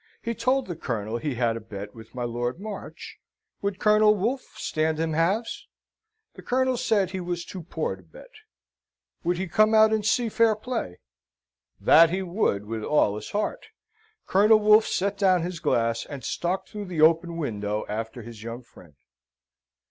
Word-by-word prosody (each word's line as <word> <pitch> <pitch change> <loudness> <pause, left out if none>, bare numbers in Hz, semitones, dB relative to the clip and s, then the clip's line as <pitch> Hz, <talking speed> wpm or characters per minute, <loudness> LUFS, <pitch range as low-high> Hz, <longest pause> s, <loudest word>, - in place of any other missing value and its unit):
He 235 - -2
told 255 +3 +1
the 175 - -5
Colonel 115 -6 -3
he 145 +1 -3
had 120 -1 +1
a - - -4
bet 100 -1 -8
with 115 +2 -14
my 125 - -3
Lord 120 +4 -3
March 205 -1 -8 0.4
would 200 -1 -2
Colonel 210 0 +4
Wolfe 235 +7 -3
stand 155 0 -1
him 160 -1 -1
halves? 190 +9 -1 0.7
The - - -12
Colonel 260 0 +1
said 205 -6 +1
he 190 - -4
was 175 -1 -4
too 185 - -8
poor 160 - -3
to 95 - -18
bet. 80 -3 -16 0.9
Would 175 +1 0
he 190 +1 -3
come 215 +6 +3
out 220 0 +6
and 215 -1 0
see 235 +3 +2
fair 225 0 +3
play? 215 - -4 0.8
That 165 +1 +6
he 190 +3 -2
would 170 - 0
with 110 0 -5
all 105 -8 +2
his 105 - -7
heart. 215 - -3 0.6
Colonel 210 +3 +5
Wolfe 215 +1 +5
set 200 +1 -1
down 185 -4 +3
his 175 -1 -4
glass, 115 -3 0
and 140 -4 -8
stalked 175 +8 -2
through 210 -1 -6
the 175 -4 -3
open 165 +1 +4
window 105 -8 -3
after 115 +2 -5
his 115 -2 -10
young 115 +2 -7
friend. 85 - -18
170 Hz, 175 wpm, -25 LUFS, -, 0.9 s, out